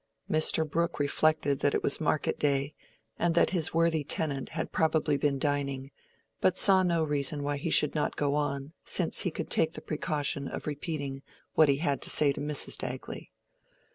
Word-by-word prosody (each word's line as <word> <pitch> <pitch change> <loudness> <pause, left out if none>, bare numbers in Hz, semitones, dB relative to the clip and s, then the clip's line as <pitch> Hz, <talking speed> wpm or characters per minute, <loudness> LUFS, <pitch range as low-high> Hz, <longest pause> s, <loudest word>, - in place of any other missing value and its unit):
Mr. 155 0 +3
Brooke 170 +3 -2
reflected 145 -1 +1
that 145 - +1
it - - -2
was 140 - +1
market 155 -1 -1
day, 140 0 +1 0.5
and 170 -1 0
that - - +3
his 170 -4 +2
worthy 165 -2 +1
tenant 140 -2 -1
had - - -4
probably 160 -2 +1
been 140 0 0
dining, 140 -1 -2 0.5
but 185 - +1
saw 190 -2 +6
no 170 -3 +1
reason 145 -1 -1
why 145 0 -2
he 140 - -4
should 150 - +3
not 150 - -2
go 145 -1 -1
on, 145 0 -3
since 175 -4 +2
he 180 - +3
could 165 -1 -6
take 160 0 +3
the - - -5
precaution 150 -3 -2
of - - -7
repeating 145 -2 -5 0.3
what 155 -2 +4
he 140 - +2
had 145 -2 -1
to - - -2
say 145 -2 +6
to - - -6
Mrs. 150 -1 -2
Dagley. - - -5
150 Hz, 185 wpm, -28 LUFS, 140-160 Hz, 0.5 s, saw